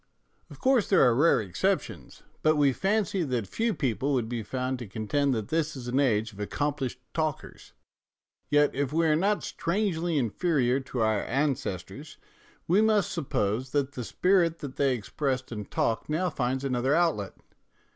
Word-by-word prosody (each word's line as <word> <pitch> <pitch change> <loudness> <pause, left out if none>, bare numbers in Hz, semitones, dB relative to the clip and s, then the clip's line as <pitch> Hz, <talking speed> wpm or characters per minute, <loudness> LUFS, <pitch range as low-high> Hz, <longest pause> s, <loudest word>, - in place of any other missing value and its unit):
Of - - -13
course 260 -4 +2
there 190 - +5
are 125 -2 +5
rare 145 +8 +4
exceptions, 105 - -2 0.2
but 155 0 +3
we 145 -3 +3
fancy 195 - 0
that 125 -8 -1
few 225 - -1
people 135 +1 -1
would 120 -4 0
be 120 0 -3
found 130 +3 -3
to 120 - -7
contend 110 +8 0
that 110 -2 -4
this 160 -2 0
is 125 -2 -7
an 125 +3 +1
age 110 -5 +1
of 100 - -14
accomplished 135 +3 -2
talkers. 155 -3 -4 0.8
Yet, 145 0 +3
if 140 -1 -1
we 165 +2 +2
are 155 -1 +4
not 200 +6 +1
strangely 170 -3 -1
inferior 135 - +1
to 130 -2 -4
our 110 -2 +2
ancestors, 135 - -3 0.5
we 185 +5 +4
must 215 -3 +2
suppose 125 - -1
that 140 -2 +1
the 125 -3 -5
spirit 175 - +2
that 140 -4 -7
they 135 -2 +2
expressed 130 +3 -3
in 105 -3 -5
talk 115 +6 -1
now 170 +3 0
finds 130 -1 -1
another 130 +1 +1
outlet. 165 - 0
140 Hz, 165 wpm, -27 LUFS, 120-165 Hz, 0.8 s, there